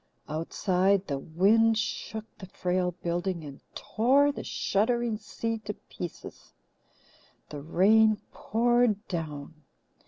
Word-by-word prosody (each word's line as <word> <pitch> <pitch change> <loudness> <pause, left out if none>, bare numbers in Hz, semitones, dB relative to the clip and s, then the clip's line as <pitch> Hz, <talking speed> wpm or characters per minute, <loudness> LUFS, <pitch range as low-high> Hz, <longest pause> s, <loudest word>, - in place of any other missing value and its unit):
Outside, 185 +5 +1
the 140 -2 -3
wind 215 +9 +3
shook 220 0 -3
the 190 - -9
frail 180 0 -1
building 175 0 -2
and 140 -2 -10
tore 270 +7 +3
the - - -7
shuddering 225 +2 0
sea 225 +1 -4
to 210 - -4
pieces. 175 -2 -9 1.0
The 145 -1 -7
rain 215 +7 +4
poured 235 -2 +1
down. 155 -4 -5
200 Hz, 105 wpm, -28 LUFS, 175-225 Hz, 1.0 s, rain